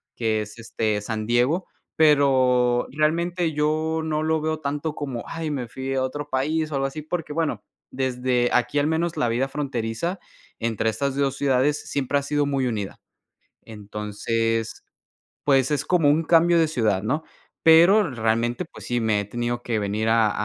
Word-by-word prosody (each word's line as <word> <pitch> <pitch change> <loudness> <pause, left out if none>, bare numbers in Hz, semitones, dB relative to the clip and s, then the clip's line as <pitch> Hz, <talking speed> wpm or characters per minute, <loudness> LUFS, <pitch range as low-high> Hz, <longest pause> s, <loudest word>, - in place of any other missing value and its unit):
que 110 -2 0
es, 105 +2 -8
este, 110 -2 -1
San 110 0 -4
Diego, 125 +10 +1 0.3
pero, 130 -5 +3
realmente 165 +3 0
yo 155 +2 0
no 155 -1 -1
lo 160 0 +1
veo 155 0 -1
tanto 150 +1 -3
como, 135 -5 -4
ay, 165 -1 -4
me 130 -5 -3
fui 130 +3 -5
a 130 - +1
otro 145 +3 -4
país 155 +4 -1
o - - -2
algo 135 0 0
así, 155 +3 -6
porque 155 -1 -4
bueno, 160 -1 -1 0.3
desde 125 -1 0
aquí 125 +4 +1
al 145 - +1
menos 165 +1 0
la 120 - +1
vida 125 +4 0
fronteriza 135 - -3 0.4
entre 115 -1 0
estas 135 +5 -2
2 135 -1 0
ciudades 140 +1 +2
siempre 140 0 0
ha - - -5
sido 145 0 0
muy 135 -2 0
unida. 105 -4 -4 0.6
Entonces, 110 +2 -3 0.6
pues 135 -1 +3
es 145 - 0
como 170 -5 +3
un 155 +3 +3
cambio 170 +1 +4
de 160 -1 +3
ciudad, 110 -9 0
¿no? 150 +9 -1 0.4
Pero 170 +5 +6
realmente, 120 +5 0
pues - - -12
sí, 120 -1 0
me 110 -2 +1
he - - -3
tenido 120 +2 -3
que 115 -3 -1
venir 105 +2 -1
a 110 -2 +4
135 Hz, 175 wpm, -24 LUFS, 115-155 Hz, 0.6 s, Pero